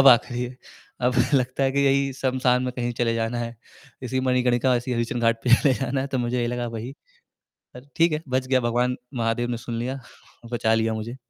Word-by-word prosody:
अब 135 - +8
आख़िरी 120 0 +4
है, 125 +1 -6 0.4
अब 125 0 +1 0.2
लगता 130 +1 +1
है 135 - +1
कि 140 - +1
यही 135 0 +2
श्मशान 130 -1 +1
में 125 -1 -2
कहीं 120 -1 -1
चले 115 -1 +2
जाना 115 +1 -1
है, 115 0 -4 0.5
इसी 130 +1 -1
मणिकर्णिका, 125 0 +2
इसी 125 +1 -3
हरिशचन्द्र 120 0 -1
घाट 115 0 +1
पे 120 -1 +7
चले 135 0 +3
जाना 135 0 -1
है 135 - -2
तो 135 -2 -2
मुझे 120 +1 -1
यही 120 - 0
लगा 120 0 -2
वही 120 +5 -6 0.8
पर 125 +3 -12
ठीक 165 -1 +4
है, 155 +1 -2
बच 130 0 0
गया। 130 -1 +3
भगवान 125 +1 0 0.2
महादेव 120 0 0
ने 120 - -1
सुन 115 -1 -3
लिया, 130 +3 -3 0.5
बचा 115 -1 +2
लिया 110 0 +1
मुझे। 115 +4 -5
125 Hz, 220 wpm, -24 LUFS, 120-130 Hz, 0.8 s, अब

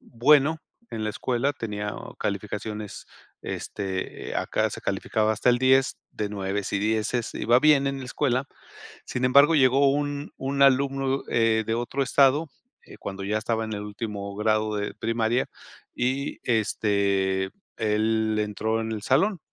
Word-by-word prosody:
bueno, 145 +5 +3 0.3
en 110 - -4
la 105 - -1
escuela 125 +6 -1
tenía 105 -5 -4 0.2
calificaciones, 105 -2 -4 0.4
este, 95 -2 -5
acá - - 0
se - - -7
calificaba 110 0 0
hasta 110 +3 +2
el 120 - +2
10, 130 +1 +3
de 105 -1 -3
nueves 100 0 -3
y 100 - +1
dieces, 110 +2 -1
iba 120 +3 +3
bien 150 -2 +5
en 135 0 -1
la - - -6
escuela. 130 0 0 0.6
Sin 125 0 -2
embargo, 140 +5 +6
llegó 135 0 +5
un 145 0 -2
un 140 +1 -2
alumno, 135 0 +2
eh, 115 -1 +2
de 115 - +1
otro 120 +4 -1
estado, 140 +4 +3 0.4
eh, - - -13
cuando 95 0 -6
ya 105 +2 0
estaba 115 0 -1
en 110 - -5
el 105 - -4
último 105 -1 -5
grado 110 0 +1
de 105 - -3
primaria 115 +2 0 0.5
y, 130 +3 -1
este, 100 -4 +1 0.3
él 110 0 +1
entró 110 +1 -1
en 110 0 -4
el 110 -2 -4
salón. 175 - +2
115 Hz, 150 wpm, -25 LUFS, 105-135 Hz, 0.6 s, embargo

